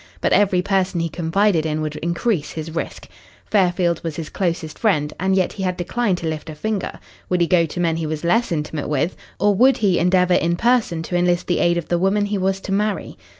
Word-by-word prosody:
But - - +1
every 190 -3 +3
person 190 -2 0
he 165 0 -1
confided 175 +2 +1
in 155 -1 -1
would 155 -1 -3
increase 170 +1 -1
his 160 0 -5
risk. 165 - -5 0.4
Fairfield 180 -4 +1
was 165 -3 -4
his 165 -3 -5
closest 170 -4 -2
friend, 150 -10 +1
and 190 +2 +1
yet 185 -2 +1
he 195 - -7
had 180 -1 -1
declined 195 +2 0
to 170 - -4
lift 155 0 -4
a 155 - -7
finger. 210 +4 -3 0.3
Would 180 - +1
he 170 - +4
go 170 -1 +3
to 165 - -6
men 165 -2 +1
he 165 -1 -2
was 155 0 -4
less 225 +7 +2
intimate 150 -2 -3
with 150 +4 0 0.2
or 205 +1 +3
would 255 +6 +4
he 195 -5 +2
endeavour 180 +1 +3
in 170 0 +2
person 225 -6 +1
to 175 - -4
enlist 175 0 +2
the 175 - 0
aid 175 0 +2
of 170 - -3
the 175 - +1
woman 200 +3 +2
he 205 -1 -2
was 190 +1 0
to 195 - -6
marry? 205 0 -1
175 Hz, 230 wpm, -21 LUFS, 165-195 Hz, 0.4 s, he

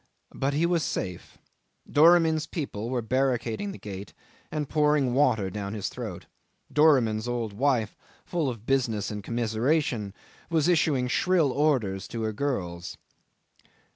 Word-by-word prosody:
But 140 +1 -1
he 160 +3 +2
was 170 -1 +2
safe. 90 - -4 0.5
Doramin's 160 0 +5
people 120 - -4
were 125 -2 -1
barricading 130 - 0
the - - -8
gate 100 -1 -8 0.4
and 150 -2 -2
pouring 150 -4 +2
water 110 -8 +2
down 100 +1 -4
his 105 - -3
throat; - - -7 0.5
Doramin's 125 -8 +4
old 120 -3 -2
wife, 120 -2 +1 0.3
full 165 -6 -1
of 115 -3 -7
business 120 -7 0
and 105 -1 -5
commiseration, 115 -1 0 0.3
was 165 -2 +2
issuing 150 -7 +2
shrill 165 +2 +2
orders 125 -10 +1
to 115 -1 -4
her 110 0 -1
girls. 95 -9 -3
125 Hz, 135 wpm, -27 LUFS, 110-150 Hz, 0.5 s, Doramin's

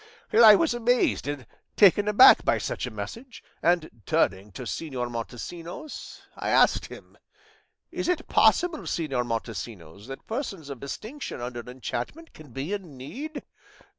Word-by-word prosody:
I 220 -2 +9
was 320 +3 +2
amazed 240 - +1
and 145 -4 -4 0.3
taken 205 0 +6
aback 210 +5 +8
by - - +2
such - - -3
a - - -7
message, 250 +1 -8 0.2
and 165 -9 0
turning 95 +2 +1
to - - -7
Señor 130 -6 -4
Montesinos 165 - -7
I - - -3
asked - - +4
him, - - -13 0.7
'Is - - -3
it 360 - 0
possible, 340 -3 +3
Señor 135 -7 -2
Montesinos, 110 -4 -6
that 135 0 -9
persons 195 - -5
of 135 - -7
distinction 220 - -6
under 120 0 -5
enchantment 130 - -6
can 155 -4 -14
be 135 - -4
in 180 -9 -6
need? 285 - -7
160 Hz, 140 wpm, -26 LUFS, -, 0.7 s, I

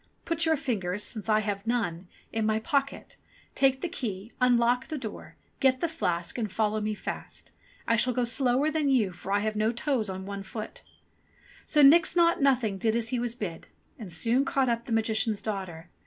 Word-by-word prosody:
Put 330 -1 0
your 320 -1 +3
fingers, 210 -7 -2
since 220 -1 -6
I 215 0 +4
have 205 0 -4
none, 185 -7 -1 0.3
in 225 -1 0
my 215 0 +2
pocket, 275 +5 -2 0.4
take 270 -1 +2
the - - -1
key, 220 - -5
unlock 245 0 +3
the 310 - -4
door, 225 -6 -8 0.2
get 260 -2 +3
the 335 - 0
flask, 175 - -2
and 215 -4 -2
follow 215 0 0
me 210 0 -2
fast. - - -7 0.4
I 230 - +3
shall 250 +3 +2
go 250 0 0
slower 255 +4 +2
than 305 -2 +1
you 230 -8 +2
for 185 +2 -7
I 200 0 +2
have 215 0 -1
no 215 +1 +1
toes 240 -3 -1
on 190 0 -5
one 200 0 -5
foot 215 +3 -7 0.4
!" - - -27
So 300 -2 +4
Nix 325 +5 +6
Naught 340 -2 +4
Nothing 245 -8 +2
did 225 0 +1
as 230 -1 0
he 250 -1 -1
was 240 -1 -2
bid, 190 -8 -6 0.3
and 205 -6 -8
soon 230 +10 +2
caught 270 -2 +1
up 235 0 -1
the - - -8
Magician's 220 -1 +1
daughter. 180 -6 -5
230 Hz, 200 wpm, -28 LUFS, 210-265 Hz, 0.4 s, Nix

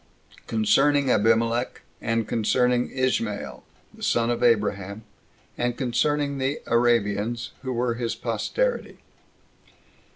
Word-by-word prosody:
Concerning 135 +5 +3
Abimelech; 115 +3 +1 0.2
And 115 -1 -1
Concerning 125 +2 +1
Ismael 110 - -2 0.3
The - - -17
Son 115 0 +1
Of 120 - -2
Abraham; 105 -3 +1 0.6
And 120 0 -1
Concerning 140 +3 0
The 135 +3 -1
Arabians, 115 -1 +1
Who 130 -1 -4
Were 120 0 0
His 115 -2 -3
Posterity. 125 - -2
120 Hz, 100 wpm, -25 LUFS, 110-130 Hz, 0.6 s, Concerning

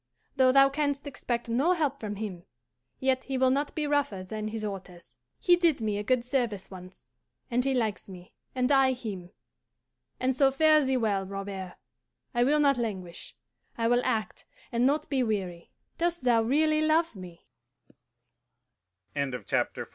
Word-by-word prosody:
Though 260 -2 +5
thou 275 +1 +7
canst 285 0 -1
expect 245 -4 -3
no 265 +10 +2
help 290 -5 -1
from 210 -2 -4
him, 195 -4 -6 0.6
yet 260 0 +1
he 270 -1 -2
will 260 0 +3
not 285 +4 -1
be 310 -2 -1
rougher 285 -10 0
than 215 +3 -5
his 215 0 -4
orders. 180 -9 -8 0.2
He 350 - +4
did 340 -5 +2
me 210 -2 -1
a - - -3
good 240 +2 +1
service 240 -8 -2
once, 185 0 -12 0.5
and 245 +1 +2
he 270 0 +1
likes 215 -6 -2
me, 180 -1 -12 0.2
and 255 +1 +1
I 270 -1 +5
him. 205 -8 -7 0.9
And 255 0 +1
so 270 +1 +5
fare 310 +2 +4
thee 265 -1 +1
well, 205 -5 0
Robert. 195 -2 -6 0.6
I 240 -1 +3
will 295 +4 +3
not 280 -3 +4
languish; 190 -7 -5 0.4
I 230 -1 +1
will 245 +1 +3
act, 215 -3 -2 0.2
and 240 +2 +2
not 300 +2 0
be 270 -2 0
weary. 190 -7 -2 0.3
Dost 345 -3 0
thou 240 -2 +4
really 305 +6 +2
love 315 -2 +2
me?" 180 -3 -11
245 Hz, 160 wpm, -28 LUFS, 205-280 Hz, 0.9 s, thou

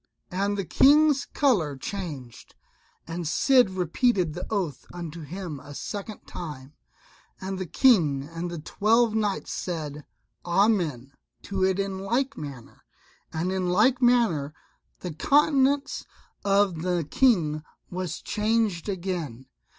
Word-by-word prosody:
And 200 +3 0
the 195 - -2
King's 290 - +5
colour 180 - +1
changed; 140 - -7 0.5
and 170 +1 -5
the 165 - -4
Cid 250 - +4
repeated 185 0 +1
the 180 +3 -6
oath 190 -9 -2
unto 170 -2 -7
him 165 -1 -6
a 145 +2 -11
second 205 +4 -6
time, 150 -5 -8 0.7
and 190 0 -4
the 185 - -4
King 160 - +4
and 165 +2 -5
the 170 - -5
twelve 220 +8 +2
knights 210 -2 -1
said 150 -4 -4 0.4
"Amen" 175 - +1 0.3
to 195 -1 -2
it 190 0 +2
in 195 -1 -2
like 250 +8 -1
manner, 140 -6 -9 0.5
and 165 +3 -2
in 185 -1 -1
like 235 +8 +3
manner 220 - +3 0.5
the 180 -3 -5
countenance 280 - +2 0.4
of 195 -4 +2
the 175 -3 -1
King 170 - +3 0.3
was 185 -1 -4
changed 215 -4 0
again. 170 - -4
185 Hz, 125 wpm, -26 LUFS, 160-215 Hz, 0.7 s, King's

